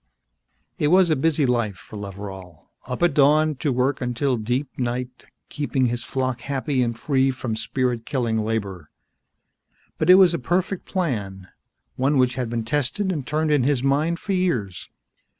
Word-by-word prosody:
It 150 - +2
was 180 +1 +5
a - - +4
busy 150 +1 +1
life 120 -5 0
for 110 - -13
Loveral, 95 -4 -9 0.2
up 125 +6 -3
at 175 -4 +3
dawn 150 +2 +4
to 145 - -1
work 130 +2 0
until 125 +2 0
deep 125 +5 -3
night, 125 +1 -4 0.2
keeping 145 -3 -1
his 120 0 -1
flock 130 -1 -2
happy 140 -1 -1
and 115 -2 -1
free 135 0 +1
from 130 -3 -3
spirit 125 0 -1
killing 115 -3 -1
labor. 100 -7 -3 1.1
But - - 0
it 185 - +10
was 185 -3 +6
a - - -1
perfect 180 +7 -1
plan, 105 - -3 0.5
one 135 +3 +2
which 125 -1 +3
had 125 -2 -3
been 115 -1 -3
tested 150 - -1
and 150 -7 -4
turned 155 +1 0
in 145 -2 +4
his 130 0 +1
mind 150 +5 +1
for 195 - -3
years. 120 - -1
130 Hz, 170 wpm, -23 LUFS, 115-150 Hz, 1.1 s, it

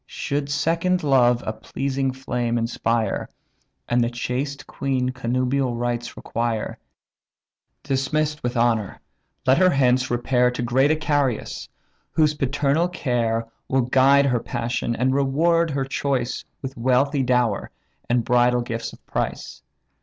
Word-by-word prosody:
Should 140 0 -3
second 165 +5 +1
love 125 -4 +3
a 110 - -2
pleasing 135 +4 -2
flame 120 -2 -2
inspire, 115 -2 -1 0.6
And 120 0 +2
the 115 - 0
chaste 125 +4 -3
queen 130 -2 -1
connubial 130 +1 -1
rights 120 0 -3
require; 115 -1 -3 1.0
Dismiss'd 150 +3 -1
with 120 0 -2
honour, 115 -4 +1 0.5
let 130 +4 +4
her 185 -1 +6
hence 130 -4 +2
repair 125 +1 +2
To 125 0 -3
great 130 +4 +3
Icarius, 145 -6 -1 0.4
whose 155 -1 +3
paternal 145 +3 +1
care 120 -9 -1 0.2
Will 135 0 +2
guide 135 +3 +4
her 125 -3 +2
passion, 120 0 -2
and 130 +3 +1
reward 160 +5 +2
her 140 -2 -1
choice 135 -2 -2 0.2
With 135 0 -5
wealthy 130 +4 +2
dower, 125 -4 +1 0.4
and 120 -1 +2
bridal 125 0 +3
gifts 115 -1 -4
of - - -17
price. - - -4
130 Hz, 130 wpm, -23 LUFS, 120-140 Hz, 1.0 s, her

